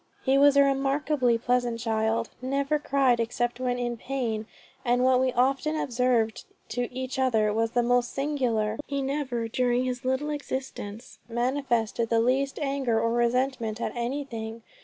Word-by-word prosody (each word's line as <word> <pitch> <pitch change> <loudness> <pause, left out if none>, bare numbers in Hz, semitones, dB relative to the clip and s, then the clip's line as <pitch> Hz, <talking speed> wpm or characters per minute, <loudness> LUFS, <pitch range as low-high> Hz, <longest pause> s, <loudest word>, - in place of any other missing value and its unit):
"He 265 0 +4
was 280 0 +6
a 280 - +8
remarkably 275 -2 +1
pleasant 245 0 0
child 225 0 0
never 275 +3 0
cried 270 -4 +2
except 240 +1 -1
when 250 -1 0
in 240 -1 -2
pain, 230 -4 -3 0.4
and 245 0 +2
what 255 0 +4
we 260 0 +2
often 270 +5 +1
observed 245 -5 +1 0.3
to 245 +1 -2
each 260 +1 -4
other 220 -5 +2
was 225 +1 0
the 240 - +3
most 245 0 +2
singular, 245 -7 0
he 280 -1 -2
never 265 -4 -2
during 245 +1 +1
his 250 -1 -3
little 260 +4 0
existence 260 -6 -6
manifested 240 -2 0
the 230 - +3
least 265 +4 +1
anger 270 -5 0
or 230 0 +1
resentment 240 -1 0
at - - -3
anything. 235 -3 -4
245 Hz, 155 wpm, -27 LUFS, 230-270 Hz, 0.4 s, a